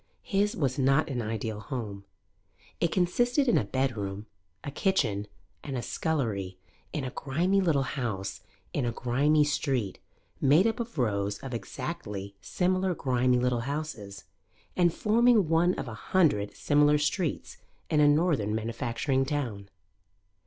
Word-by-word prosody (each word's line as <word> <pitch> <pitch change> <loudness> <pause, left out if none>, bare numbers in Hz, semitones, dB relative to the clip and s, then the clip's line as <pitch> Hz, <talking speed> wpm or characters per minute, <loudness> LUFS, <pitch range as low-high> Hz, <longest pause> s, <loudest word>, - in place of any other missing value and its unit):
His 205 +1 +1
was 135 -5 -1
not 135 +4 +3
an 125 -2 -1
ideal 110 -1 -3
home; 105 -5 -6 0.7
it 170 - +1
consisted 240 +10 +2
in 240 - +4
a - - +3
bedroom, 105 -4 -2 0.4
a 140 - -5
kitchen 120 - 0 0.4
and 135 -3 -4
a 120 - -3
scullery 105 - -2 0.3
in 150 - -3
a 130 - -4
grimy 175 +10 +1
little 155 -7 +2
house 120 -8 -3 0.3
in 140 - 0
a 120 - 0
grimy 140 +6 +2
street 135 -8 -1 0.4
made 150 +8 +5
up 225 0 0
of 235 -5 -5
rows 100 -5 0
of 135 -2 -6
exactly 115 - -5
similar 185 - 0
grimy 125 -2 +2
little 125 -1 +1
houses, 140 -10 -5 0.5
and 175 -2 +4
forming 225 +1 +3
one 165 +3 +3
of - - -5
a 115 - -6
hundred 110 - +1
similar 150 0 +4
streets 150 +3 -2 0.3
in 150 - +3
a 150 - +6
northern 145 - +2
manufacturing 115 +4 -1
town. 125 -9 -3
135 Hz, 140 wpm, -28 LUFS, 115-165 Hz, 0.7 s, a